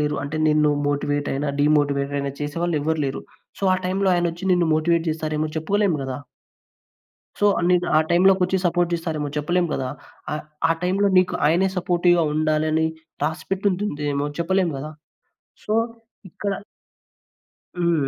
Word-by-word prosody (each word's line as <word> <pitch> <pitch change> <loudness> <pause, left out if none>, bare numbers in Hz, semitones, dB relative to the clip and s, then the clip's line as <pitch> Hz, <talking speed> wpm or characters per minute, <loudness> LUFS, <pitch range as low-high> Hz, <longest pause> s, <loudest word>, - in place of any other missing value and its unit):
లేరు. 150 0 0
అంటే 145 +2 -4
నిన్ను 150 -1 +3 0.2
మోటివేట్ 145 0 -1
అయిన, 140 +2 -2
డీమోటివేట్ 145 -1 +2
అయిన 140 0 -1
చేసేవాళ్ళు 165 +3 -1
ఎవ్వరు 160 +2 -1
లేరు. 135 -1 -3 0.4
సో - - -18
ఆ - - +1
టైమ్‌లో 190 +1 +1
ఆయనొచ్చి 175 +2 -1
నిన్ను 175 -2 +2
మోటివేట్ 165 +1 +1
చేస్తారేమో 155 0 -2
చెప్పుకోలేము 190 +1 +1
గదా! 130 -1 -4 1.2
సో 205 - +3 0.2
నిన్ను 180 -1 +3
ఆ - - +6
టైమ్‌లో 185 +3 +6
కొచ్చి 185 +1 +2
సపోర్ట్ 175 0 +1
జేస్తారేమో 160 -3 -2
చెప్పలేం 175 +4 +1
గదా! 130 -1 -2 0.4
ఆహ్, 150 - -4 0.3
ఆ - - +5
టైమ్‌లో 195 +3 +2
నీకు 185 0 +3
ఆయనే 175 +5 +3
సపోర్టివ్‌గా 175 -1 +3
ఉండాలని 155 +1 +1 0.4
రాసిపెట్టుంటుందేమో 160 -4 -1
చెప్పలేం 185 +1 +1
గదా! 150 +3 -6 0.7
సో, 210 - -2 0.6
ఇక్కడ 200 +4 -4 1.3
హ్మ్. 170 -5 +1
160 Hz, 135 wpm, -22 LUFS, 150-180 Hz, 1.3 s, ఆ